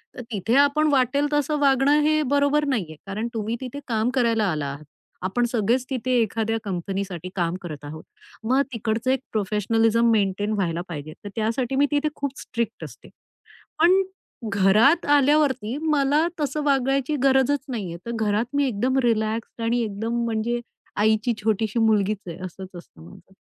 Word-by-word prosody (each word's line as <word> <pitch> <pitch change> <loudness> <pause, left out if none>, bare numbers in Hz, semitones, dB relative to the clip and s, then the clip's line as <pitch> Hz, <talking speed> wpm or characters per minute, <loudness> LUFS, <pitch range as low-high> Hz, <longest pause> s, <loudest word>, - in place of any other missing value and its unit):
तर 250 - -6
तिथे 215 +4 0
आपण 295 +2 +3
वाटेल 280 +2 +2
तसं 295 +1 +1
वागणं 280 +1 +4
हे 310 0 +3
बरोबर 285 +1 +3
नाहीये, 185 - -2
कारण 215 +4 -3
तुम्ही 220 +1 -2
तिथे 260 +2 -6
काम 225 0 0
करायला 230 -4 +2
आला 150 -2 -2
आहात. 140 +2 -7 0.4
आपण 215 +7 0
सगळेच 240 +3 +1
तिथे 255 -1 -2
एखाद्या 225 +1 -1
कंपनीसाठी 185 -1 -4
काम 175 -1 0
करत 155 -5 -8
आहोत, 155 +2 -8 0.4
मग 260 +4 +2
तिकडच 225 +2 -2
एक 260 0 +3
प्रोफेशनलिझम 225 +2 +2
मेंटेन 205 0 +1
व्हायला 175 -4 -1
पाहिजे, 155 -2 -7
तर 205 - -6
त्यासाठी 230 +4 -1
मी 285 +1 +4
तिथे 295 +1 +1
खूप 280 -1 -4
स्ट्रिक्ट 235 -2 -4
असते. - - -11 0.7
पण 365 +4 +5 0.5
घरात 215 - +4
आल्यावरती 280 -4 +3
मला 295 +2 +3
तसं 295 0 -1
वागायची 275 +1 +1
गरजच 265 +1 +3
नाहीये, 190 -9 -4
तर 235 - -4
घरात 215 +1 0
मी 285 0 +3
एकदम 255 +3 0
रिलॅक्स्ड 225 0 -1
आणि 235 +1 +1
एकदम 225 +3 -2
म्हणजे 230 +1 -1 0.4
आईची 220 +3 +2
छोटीशी 220 +1 0
मुलगीच 215 -2 +2
आहे 170 0 -6
असंच 185 +1 -9
असतं 170 - -13
माझं. 190 - -17
230 Hz, 155 wpm, -24 LUFS, 205-270 Hz, 0.7 s, पण